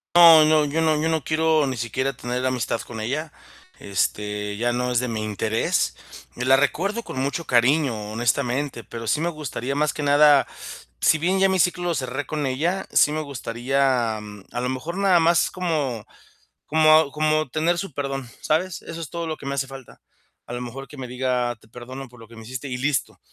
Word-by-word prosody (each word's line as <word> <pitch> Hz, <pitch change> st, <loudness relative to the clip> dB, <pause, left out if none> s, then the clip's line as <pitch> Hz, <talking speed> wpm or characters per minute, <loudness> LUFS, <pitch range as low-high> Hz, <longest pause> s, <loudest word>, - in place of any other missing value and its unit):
No, 165 Hz, -3 st, +9 dB
no, 155 Hz, -1 st, +4 dB
yo 150 Hz, +3 st, -1 dB
no 155 Hz, -1 st, +2 dB
yo 160 Hz, -, +1 dB
no 160 Hz, -4 st, 0 dB
quiero 155 Hz, -1 st, +2 dB
ni 130 Hz, -, -2 dB
siquiera 130 Hz, +4 st, -2 dB
tener 125 Hz, +1 st, -3 dB
amistad 125 Hz, -3 st, -1 dB
con 110 Hz, -2 st, -8 dB
ella, 150 Hz, +7 st, -3 dB, 0.5 s
este, 105 Hz, +1 st, -2 dB
ya 120 Hz, +2 st, +1 dB
no 125 Hz, +1 st, -1 dB
es 120 Hz, -, +2 dB
de 125 Hz, -, -2 dB
mi 110 Hz, -2 st, -3 dB
interés, 110 Hz, +1 st, 0 dB, 0.4 s
la 130 Hz, +2 st, +3 dB
recuerdo 190 Hz, -, 0 dB
con 130 Hz, -, -9 dB
mucho 140 Hz, +5 st, -2 dB
cariño, 120 Hz, -4 st, +2 dB
honestamente, 120 Hz, +2 st, -1 dB
pero 115 Hz, -1 st, -8 dB
sí 150 Hz, -, +1 dB
me 170 Hz, -, +1 dB
gustaría 140 Hz, -4 st, -4 dB
más 150 Hz, +1 st, +1 dB
que 150 Hz, -, -5 dB
nada 145 Hz, -1 st, +6 dB, 0.6 s
si 160 Hz, -, +4 dB
bien 185 Hz, +5 st, +1 dB
ya 195 Hz, 0 st, +4 dB
mi 190 Hz, -, +1 dB
ciclo 180 Hz, 0 st, +1 dB
lo 170 Hz, -, 0 dB
cerré 135 Hz, 0 st, -3 dB
con 150 Hz, -2 st, -2 dB
ella, 165 Hz, +9 st, -1 dB
sí 150 Hz, -, +4 dB
me 155 Hz, +1 st, -2 dB
gustaría 125 Hz, -3 st, 0 dB
a 105 Hz, +2 st, -8 dB
lo 125 Hz, -, -1 dB
mejor 160 Hz, +8 st, -4 dB
nada 190 Hz, -3 st, +4 dB
más 170 Hz, +1 st, +3 dB
como 150 Hz, -, -2 dB, 0.6 s
como 155 Hz, -1 st, +5 dB
como 155 Hz, -1 st, +1 dB
tener 160 Hz, +5 st, +1 dB
su 175 Hz, -4 st, -5 dB
perdón, 135 Hz, -3 st, -4 dB
¿sabes?, 165 Hz, +2 st, 0 dB
eso 165 Hz, 0 st, -8 dB
es 160 Hz, -4 st, -6 dB
todo 170 Hz, +1 st, -4 dB
lo 155 Hz, -1 st, -4 dB
que -, -, -12 dB
me 140 Hz, 0 st, -2 dB
hace 135 Hz, -1 st, 0 dB
falta. 135 Hz, -2 st, -12 dB, 0.5 s
A -, -, -5 dB
lo 120 Hz, -, -4 dB
mejor 135 Hz, +3 st, -7 dB
que 140 Hz, -, -13 dB
me 130 Hz, -3 st, -6 dB
diga: 125 Hz, -2 st, -1 dB
"Te -, -, -22 dB
perdono 130 Hz, +4 st, -9 dB
por 120 Hz, -1 st, -17 dB
lo 115 Hz, -, -13 dB
que 115 Hz, -, -14 dB
me 115 Hz, -, -10 dB
hiciste", 130 Hz, +4 st, -6 dB
y 125 Hz, -, -3 dB
listo, 135 Hz, 0 st, -1 dB
135 Hz, 205 wpm, -23 LUFS, 120-155 Hz, 0.6 s, No